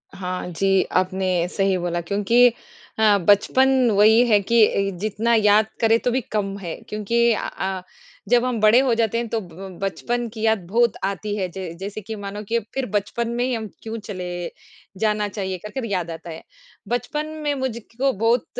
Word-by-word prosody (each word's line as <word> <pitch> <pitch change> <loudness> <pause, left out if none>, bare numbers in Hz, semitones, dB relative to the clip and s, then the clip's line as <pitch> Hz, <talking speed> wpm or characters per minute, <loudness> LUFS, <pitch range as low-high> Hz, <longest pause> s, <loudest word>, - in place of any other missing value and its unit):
हाँ 185 -1 -4
जी, 195 +3 +2
आपने 185 -1 0
सही 195 -1 +1
बोला 175 -1 -2
क्योंकि 210 +7 +4 0.5
हाँ, 210 -2 +5
बचपन 255 +5 +4
वही 220 +4 +5
है 210 -3 +5
कि 230 +2 +5
अ, 195 -2 -1
जितना 215 +3 0
याद 215 0 +4
करें 225 0 +4
तो 245 - 0
भी 260 +1 0
कम 200 -2 -1
है, 175 -4 -5
क्योंकि 235 +3 +1
अ - - -3
अ, 190 -1 -4 0.5
जब 245 0 +4
हम 245 -3 -1
बड़े 215 +3 +6
हो 260 -3 +2
जाते 230 0 +1
हैं, 235 0 -2
तो 225 - -1
ब 185 +1 -10
बचपन 240 +5 -2
की 220 0 -9
याद 220 -5 +1
बहुत 235 +3 +2
आती 205 +1 -3
है, 190 -3 -1
ज 175 -3 -5
जैसे 200 +2 -6
कि 220 +2 -6
मानो 205 0 -6
कि 230 +3 0
फिर 270 -1 -1
बचपन 230 +3 -1
में 245 - 0
ही 255 0 0
हम 220 -2 -3 0.2
क्यों 225 0 -5
चले 180 -3 -5 0.5
जाना 210 -1 +1
चाहिए 190 -2 -4
कर, 210 - -9
कर 265 0 -4
याद 185 -6 -2
आता 165 +1 -8
है। 160 0 -8 0.4
बचपन 245 +6 -2 0.2
में 295 -1 +1
मुझको 260 0 -2
बहुत 225 +3 +1
210 Hz, 190 wpm, -22 LUFS, 190-235 Hz, 0.5 s, बड़े